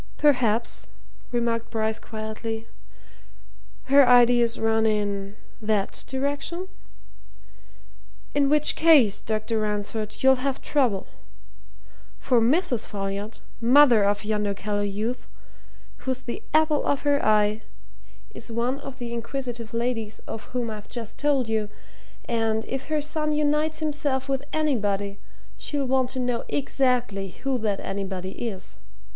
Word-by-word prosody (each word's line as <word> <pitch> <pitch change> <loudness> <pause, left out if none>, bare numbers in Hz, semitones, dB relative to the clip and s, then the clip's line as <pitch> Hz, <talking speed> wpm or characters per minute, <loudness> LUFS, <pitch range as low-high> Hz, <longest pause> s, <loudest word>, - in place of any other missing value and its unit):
"Perhaps," 240 -6 +2 0.4
remarked 235 -1 0
Bryce 220 -1 -1
quietly, 220 0 -5 1.2
"her 280 +1 +6
ideas 240 -1 +5
run 225 0 +2
in 205 -1 -1 0.2
that 210 -2 -1
direction? 285 +7 -2 1.7
In 285 -1 +3
which 300 0 +3
case, 290 -11 +5
Dr. 220 +1 -1
Ransford, 210 +1 -2
you'll 265 0 +6
have 275 0 -1
trouble. 245 -10 +1 1.1
For 245 -3 +2
Mrs. 260 - +2
Folliot, 200 +1 -4 0.2
mother 245 -2 +6
of 205 +1 +1
yonder 210 -2 0
callow 205 +1 -2
youth, 210 +5 -3 0.7
who's 260 -1 -3
the 235 - -5
apple 310 -1 +3
of 285 - 0
her 285 -1 +2
eye, 215 0 +3 0.7
is 230 - -9
one 240 +4 -1
of 275 -2 -9
the 240 -1 -5
inquisitive 235 -1 -4
ladies 230 -2 -2
of 220 - -6
whom 245 -2 -3
I've 210 -1 -8
just 230 -3 -6
told 285 -4 +2
you, 220 -2 -1 0.6
and 225 -1 0
if 270 0 -4
her 310 -1 0
son 305 +1 -1
unites 300 +1 +1
himself 290 -3 -1
with 270 0 -1
anybody, 205 -10 0 0.4
she'll 285 -2 -2
want 260 -1 +2
to 260 0 -5
know 245 -1 -1
exactly 250 -8 0 0.2
who 270 -2 0
that 210 -3 -1
anybody 190 -1 -4
is. 195 - -5
235 Hz, 125 wpm, -25 LUFS, 215-275 Hz, 1.7 s, her